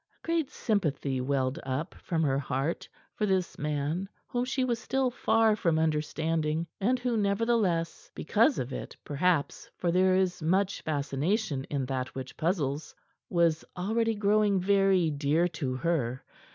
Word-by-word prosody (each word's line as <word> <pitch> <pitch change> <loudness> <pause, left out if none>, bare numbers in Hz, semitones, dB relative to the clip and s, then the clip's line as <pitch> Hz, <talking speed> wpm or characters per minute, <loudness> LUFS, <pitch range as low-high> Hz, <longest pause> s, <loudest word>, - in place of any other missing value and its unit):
A - - -14
great 330 -4 0
sympathy 150 - -1
welled 130 0 0
up 130 +5 -3
from 165 -2 -2
her 135 -2 +2
heart 140 +3 -2 0.2
for 210 - -1
this 190 -2 0
man 150 +5 -2 0.2
whom 245 -1 -1
she 260 +1 0
was 240 -2 0
still 265 +1 0
far 225 -2 +3
from 170 -6 +1
understanding, 160 +1 0
and 240 +6 +2
who, 245 -1 -1
nevertheless 200 -5 0
because 230 - +2
of 130 +1 -3
it, - - -6
perhaps, 150 +1 0
for 175 - 0
there 185 +1 +4
is 185 -2 +1
much 190 +5 +1
fascination 145 - -1
in 140 -3 -2
that 130 -1 -3
which 130 0 -6
puzzles 155 -3 -1 0.3
was 170 -2 +2
already 225 +4 +1
growing 205 -1 +3
very 195 -3 +3
dear 150 +4 +2
to 145 -6 -3
her. 130 -5 -1
170 Hz, 150 wpm, -29 LUFS, 145-205 Hz, 0.3 s, there